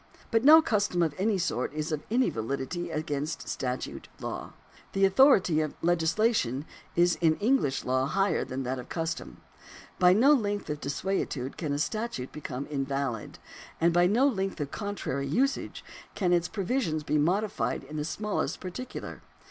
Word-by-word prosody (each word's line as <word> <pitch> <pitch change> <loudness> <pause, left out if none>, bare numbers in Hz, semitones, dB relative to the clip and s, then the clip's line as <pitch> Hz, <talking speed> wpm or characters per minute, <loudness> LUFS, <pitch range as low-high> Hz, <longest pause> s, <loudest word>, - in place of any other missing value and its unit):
But 225 0 +3
no 315 +3 +9
custom 205 - +1
of 160 -3 0
any 205 +1 +2
sort 170 -10 -1
is 155 +1 -2
of 155 -2 -1
any 250 +4 +2
validity 140 +9 -3
as 155 - -1
against 150 0 -4
statute 125 0 -4
law. - - -5 0.4
The 195 0 +4
authority 190 - +5
of 155 -2 -3
legislation 165 - +1 0.3
is 175 0 +3
in 160 -2 +4
English 210 - +1
law 130 +1 +1
higher 195 +6 +1
than 130 +1 -4
that 130 +1 -2
of 125 - -9
custom. 165 -3 -4 0.6
By 180 0 +6
no 260 +9 +6
length 205 - -1
of 150 0 -5
desuetude 140 -3 -2
can 155 -4 -3
a 145 - 0
statute 155 - -3
become 140 -2 -5
invalid, 135 -5 -3 0.4
and 170 +1 +3
by 175 +1 +5
no 240 +8 +4
length 195 -8 -2
of 145 -1 -3
contrary 200 -10 -3
usage 265 - -1 0.3
can 180 -4 +1
its 175 0 +2
provisions 195 - -1
be 150 +1 +1
modified 175 - 0
in 150 +3 -8
the 150 - -1
smallest 210 +7 -2
particular. 215 +8 -7
170 Hz, 165 wpm, -28 LUFS, 145-205 Hz, 0.6 s, no